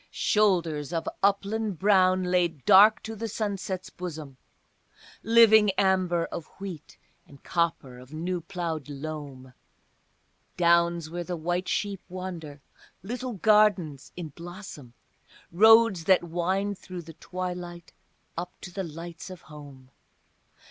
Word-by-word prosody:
Shoulders 170 -8 +1
of 165 - -2
upland 200 0 0
brown 185 -1 +3
laid 175 -5 0
dark 205 +2 +7
to 225 0 -6
the 225 +2 -4
sunset's 195 -3 -4
bosom, 155 -7 -7 0.8
Living 220 -2 +6
amber 185 -3 +2
of 165 - -6
wheat, 190 -6 -8 0.3
and 140 -1 -17
copper 160 -7 -2
of 130 +2 -15
new 175 +3 -3
ploughed 165 -5 -5
loam, 140 -3 -7 1.0
Downs 170 -2 +2
where 175 +1 -4
the 175 0 -4
white 175 +3 -2
sheep 200 -2 -2
wander, 175 -6 -7 0.4
little 245 +4 -4
gardens 205 -9 +2
in 170 -3 -5
blossom, 170 - -10 0.6
Roads 220 -1 +6
that 185 0 +4
wind 185 +4 -2
through 180 -2 -8
the 165 0 -11
twilight 180 0 -6 0.4
up 180 +2 -6
to 180 - -9
the 195 - -3
lights 170 +2 -8
of 185 -2 -10
home. 140 -4 -13
175 Hz, 120 wpm, -27 LUFS, 160-195 Hz, 1.0 s, dark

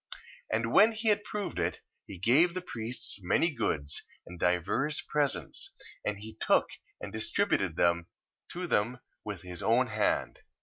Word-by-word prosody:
And 115 +1 0
when 220 +3 +7
he 220 0 0
had 205 -1 +3
proved 205 - -4
it, 85 0 -1 0.3
he 95 - -8
gave 145 - +4
the 185 - -2
priests 115 - -2
many 165 - +2
goods, 75 - -1 0.2
and 90 0 -10
divers 95 - +1
presents, 140 - 0 0.3
and 105 - -1
he 110 +1 -10
took - - +3 0.3
and - - -7
distributed 80 - +1
them 85 -1 +2 0.5
to 180 +1 -3
them 120 -5 +1 0.3
with 100 -4 -6
his 90 -1 -5
own 120 +3 +3
hand. 110 -3 0
110 Hz, 150 wpm, -30 LUFS, 90-150 Hz, 0.5 s, when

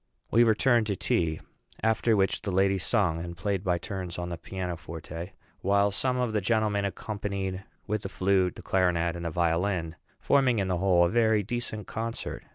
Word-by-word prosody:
We 115 +2 +6
returned 115 0 +3
to 100 - 0
tea; 80 -3 0 0.4
after 110 0 +3
which 95 -1 +1
the 100 - -4
ladies 95 0 +2
sung, 90 -8 +1
and 85 0 -7
played 100 0 -1
by 90 -3 +1
turns 90 -1 -5
on 90 0 -4
the 85 - -4
piano 90 0 -4
forte; 85 +2 -8 0.3
while 100 +1 +2
some 125 +5 0
of 125 -3 0
the 105 - +1
gentlemen 105 -1 +1
accompanied 100 -1 -4 0.2
with 105 0 -1
the 95 - -5
flute, 95 -1 +1
the - - -10
clarinet, 85 -2 +1
and 85 0 -6
the - - 0
violin, 85 +1 0 0.2
forming 135 -4 +3
in 95 -2 0
the 90 - +1
whole 90 -1 +4
a - - +1
very 110 -1 +3
decent 110 -1 -4
concert. 115 +1 -4
95 Hz, 185 wpm, -28 LUFS, 90-110 Hz, 0.4 s, We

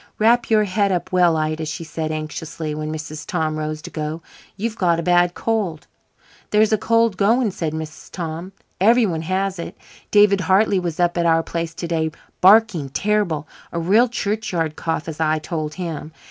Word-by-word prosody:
"Wrap 235 +2 +3
your 215 -1 +4
head 200 0 +1
up 180 -2 -2
well, 175 -3 +4
Ida," 155 0 -2
she 160 +3 -5
said 160 -1 -4
anxiously, 155 0 -5
when 155 0 -4
Mrs. 155 0 -6
Tom 160 -3 -1
rose 155 0 -4
to - - -8
go. 155 +1 -4 0.3
"You've 220 +2 -2
got 170 -5 +2
a - - -2
bad 175 0 +3
cold." 205 -9 -2 0.6
"There's 215 +1 +3
a - - +4
cold 230 -2 +2
going," 225 +3 +3
said 165 -4 -3
Mrs. 155 -1 -7
Tom. 170 +1 -5 0.3
"Everyone 205 -5 +3
has 185 +2 -1
it. 170 - -7 0.3
David 205 -2 +5
Hartley 195 +1 +3
was 170 -2 -4
up 175 0 +2
at 170 - +2
our 165 0 +3
place 165 -1 -4
to 170 +1 -4
day 160 -1 0 0.3
barking 195 -7 +5
terrible 175 -3 0 0.2
a 170 - -2
real 210 +9 +4
churchyard 200 -8 -2
cough, 165 -1 -3
as 160 -1 -6
I 155 -1 +2
told 155 -1 -4
him. 165 -4 -5
170 Hz, 180 wpm, -21 LUFS, 155-205 Hz, 0.6 s, David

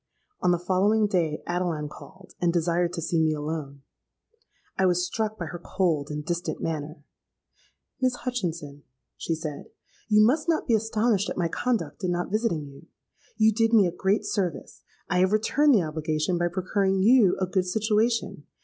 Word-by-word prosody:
On - - +2
the 175 - +3
following 195 +5 +2
day 170 -6 -1
Adeline 175 -4 -2
called, 185 +5 -14
and 175 -1 +3
desired 170 0 +1
to 165 -2 -4
see 165 +1 0
me 155 -1 +2
alone. 145 -2 -5 0.9
I 190 - +2
was 180 0 +2
struck 215 +2 -3
by 175 - -4
her 175 +1 -7
cold 165 -7 0
and 150 0 -5
distant 175 0 -3
manner. 155 -1 -4 1.0
'Miss 255 -1 +2
Hutchinson,' 170 - -4 0.3
she 165 - -2
said, 155 -2 -6 0.4
'you 215 0 +6
must 300 +8 +1
not 325 - +1
be 235 - +1
astonished 220 -1 +1
at - - -5
my 175 -2 +1
conduct 240 0 -2
in 185 - 0
not 175 +1 -2
visiting 210 -9 0
you. 140 +4 -14 0.5
You 220 -1 +4
did 225 +1 +1
me 210 -4 +6
a 175 - 0
great 190 +4 0
service: 180 -8 -3 0.3
I 180 - +1
have 185 +2 +3
returned 270 +6 +3
the 195 - +3
obligation 155 +2 -1
by 175 - +2
procuring 190 +2 0
you 225 -4 +5
a 190 - +1
good 185 0 -1
situation. 215 - 0
180 Hz, 175 wpm, -26 LUFS, 165-215 Hz, 1.0 s, you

